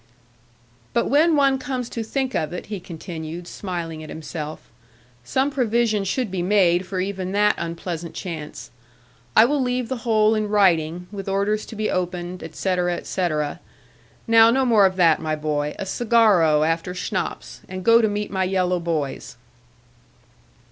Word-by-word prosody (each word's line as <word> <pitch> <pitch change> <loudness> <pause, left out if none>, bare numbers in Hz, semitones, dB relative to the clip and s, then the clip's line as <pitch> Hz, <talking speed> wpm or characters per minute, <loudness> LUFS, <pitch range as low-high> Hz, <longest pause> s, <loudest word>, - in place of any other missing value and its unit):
'But 235 - +1
when 310 +3 +4
one 275 -2 +3
comes 255 -2 -3
to 230 - -4
think 260 +3 -2
of 155 -2 -1
it,' 180 - -6
he 200 - -3
continued, 170 -1 -7
smiling 170 -5 -5
at 155 - -9
himself; 155 0 -6 0.6
'some 265 - 0
provision 235 -5 +1
should 225 +2 -1
be 185 -2 -2
made 180 -2 +3
for 185 -1 -3
even 190 0 -3
that 210 +1 +4
unpleasant 170 0 -5
chance. 160 -5 -7 0.6
I 220 - +8
will 285 +2 +1
leave 250 -1 -1
the 260 - -2
whole 220 -2 +2
in 215 -1 -1
writing, 180 -4 +2
with 195 -1 -6
orders 200 +2 0
to 225 - -9
be 215 0 -1
opened, 180 0 -3
etc., 175 +2 -1
etc. 155 -5 -2 0.7
Now 225 -1 +6
no 265 +3 +2
more 215 -5 +5
of 185 - -4
that, 170 -4 +4
my 155 -1 -1
boy; 150 -1 -2
a - - -4
cigarro 195 -9 +3
after 165 +2 -2
schnapps, 185 0 -4
and 185 0 -6
go 230 0 +6
to 220 - +3
meet 205 0 -3
my 190 -1 0
yellow 180 -1 +1
boys.' 160 -8 -3
185 Hz, 160 wpm, -22 LUFS, 170-225 Hz, 0.7 s, I